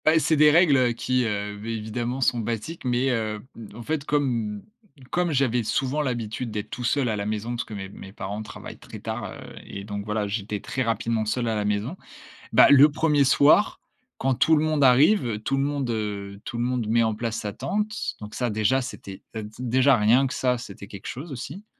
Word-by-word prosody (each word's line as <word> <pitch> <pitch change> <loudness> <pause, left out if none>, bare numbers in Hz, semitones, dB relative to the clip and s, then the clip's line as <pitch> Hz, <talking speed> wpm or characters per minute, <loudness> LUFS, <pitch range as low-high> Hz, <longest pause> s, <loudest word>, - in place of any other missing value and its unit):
Beh, 155 +1 +5
c'est 160 0 +3
des 150 0 +6
règles, 160 -2 +5
heu, 125 -2 +3
qui, 125 +1 0
heu 105 -1 -2
vi 110 +3 -5
évidemment 120 +4 -3
sont 120 -1 +2
basiques, 115 +8 -4
mais, 125 +2 +1
heu, 110 -3 -1 0.2
mmh 115 -3 -11
en 120 - -8
fait, 155 +2 -2
comme 115 -9 -1 0.5
comme 175 -1 +1
j'avais 130 -4 +1
souvent 135 +6 0
l'habitude 120 -3 -3
d'être 105 0 -4
tout 125 - -6
seul 130 +2 +1
à 110 - 0
la 100 -1 -3
maison 110 +2 -3
parce 120 - -2
que 110 - -11
mes 95 -1 -5
mes 95 0 -11
parents 100 +1 -5
travaillent 110 - -9
très - - -10
tard, - - -4
heu - - -9 0.3
et 100 - -8
donc 100 0 -5
voilà, 105 -1 -1
j'étais 105 0 -3
très 130 - -4
rapidement 115 -2 0
seul 120 +2 -1
à 110 - 0
la 105 -1 -1
maison. 105 - -1 0.6
Bah, - - +7
le 140 +1 +8
1er 150 -2 +3
soir, 145 +9 +4 0.4
quand 135 0 +1
tout 140 +6 +4
le 150 - +2
monde 155 -2 +2
arrive, 125 - +4
tout 135 +5 -1
le 135 - +1
monde, 140 -3 -2
heu, 100 -3 -4
tout 120 - -5
le - - 0
monde 125 -2 -1
met 115 +2 +3
en 110 -1 +1
place 115 0 -3
sa 105 -2 -4
tente. 210 - -2
Donc 105 0 -9
ça 125 -2 0
déjà, 110 +5 +2
c'était, 100 -6 -8 0.2
heu, 110 - -3
d 105 - -8
déjà 130 +2 +3
rien 120 +5 +4
que 130 - -5
ça, 125 -1 +1
c'était 100 -4 -9
quelque 100 0 -9
chose 140 +5 -6
aussi. 140 - -7
120 Hz, 225 wpm, -25 LUFS, 105-135 Hz, 0.6 s, le